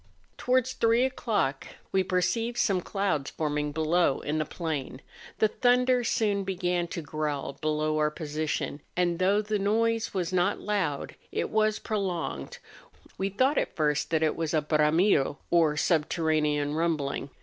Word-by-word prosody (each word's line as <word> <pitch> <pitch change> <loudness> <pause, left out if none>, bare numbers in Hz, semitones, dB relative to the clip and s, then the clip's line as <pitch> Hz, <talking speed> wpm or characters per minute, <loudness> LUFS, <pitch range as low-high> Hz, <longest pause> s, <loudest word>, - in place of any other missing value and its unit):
Towards 255 0 +1
three 230 +2 +3
o'clock 205 - -1 0.2
we 190 - +3
perceived 210 +6 0
some 195 -6 +2
clouds 175 -8 -1
forming 150 -1 -2
below 160 0 +2
in 150 +2 -2
the 155 - 0
plain; 150 -6 -4 0.4
the 215 - +4
thunder 250 +2 +2
soon 205 -3 +1
began 180 -2 -1
to 170 0 -5
growl 150 -2 -3
below 155 0 0
our 150 0 +3
position, 150 -1 -3 0.2
and 175 -1 +1
though 200 +3 +3
the 210 0 -1
noise 225 +3 +1
was 185 -2 -2
not 185 +2 +1
loud, 195 -9 -2 0.2
it - - -2
was 215 0 +2
prolonged; 175 - -3 0.6
we 195 +1 0
thought 260 +9 +2
at - - -3
first 150 -2 0
that 160 -1 +1
it 155 - +1
was 165 -1 -2
a 155 - +2
hramido, 150 0 +2
or 160 -3 +3
subterranean 150 -2 +1
rumbling. 155 -4 -1
170 Hz, 150 wpm, -28 LUFS, 150-205 Hz, 0.6 s, the